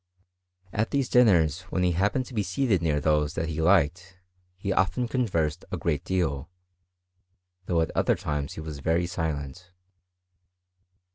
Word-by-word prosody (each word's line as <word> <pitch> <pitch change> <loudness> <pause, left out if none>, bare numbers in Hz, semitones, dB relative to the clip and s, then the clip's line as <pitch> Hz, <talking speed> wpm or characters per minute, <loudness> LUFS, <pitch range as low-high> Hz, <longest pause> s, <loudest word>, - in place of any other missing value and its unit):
At 110 +2 0
these 140 -3 0
dinners, 90 - +4
when 90 - 0
he 90 - +3
happened 100 +9 0
to 125 - -12
be 110 - 0
seated 100 0 0
near 75 -3 +1
those 75 0 +1
that 80 0 -2
he 80 0 -2
liked, 90 +2 +2 0.4
he 100 +1 -2
often 120 +7 +1
conversed 90 - -1
a - - -2
great 75 -5 -1
deal; 80 -5 -1 1.2
though 85 -2 +2
at 80 - -1
other - - +2
times 75 -1 -3
he - - -7
was 80 -2 -7
very 80 +4 +1
silent. 80 0 -4
85 Hz, 150 wpm, -26 LUFS, 75-95 Hz, 1.2 s, dinners